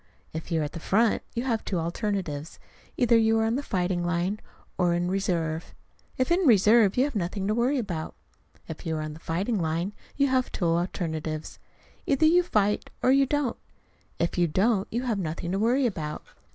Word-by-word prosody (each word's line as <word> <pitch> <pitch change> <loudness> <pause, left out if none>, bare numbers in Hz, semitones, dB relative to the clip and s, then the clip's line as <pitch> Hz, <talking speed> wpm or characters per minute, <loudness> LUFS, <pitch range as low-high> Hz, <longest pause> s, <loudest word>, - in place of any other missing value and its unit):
If 160 +3 -6
you 165 -1 +1
are - - 0
at 145 - -4
the 170 - -7
front, 220 +6 +2
you 235 - -1
have 230 -4 -1
two 190 - -2
alternatives: 170 -3 -3 0.4
either 240 -2 +4
you 225 0 +4
are 220 - +2
on 225 +1 +1
the 275 - -1
fighting 180 -7 -1
line 175 +4 -1 0.4
or 175 -2 +2
in 175 +1 -1
reserve. 170 -4 -2 0.4
If 255 +5 0
in 345 - +4
reserve, 215 -1 +5
you 255 - +5
have 290 - -1
nothing 195 +1 -2
to 210 - +1
worry 245 +5 +1
about. 180 -10 -4 0.5
If 160 - -7
you 160 -1 -2
are 155 - -2
on 155 0 -5
the 155 - -11
fighting 190 +8 -1
line, 165 +5 -1 0.2
you 280 - +4
have 260 -2 +1
two 180 - -2
alternatives: 165 -2 -2 0.5
either 280 +2 +3
you 345 +3 +6
fight 210 - 0
or 255 - +5
you 275 0 +4
don't. 290 -3 0 0.6
If 170 +1 -1
you 175 - +4
don't, 195 +5 +1
you 240 +3 -2
have 230 -5 -1
nothing 170 0 -3
to 195 - 0
worry 245 +5 +2
about. 155 -9 -3
195 Hz, 200 wpm, -27 LUFS, 170-235 Hz, 0.6 s, you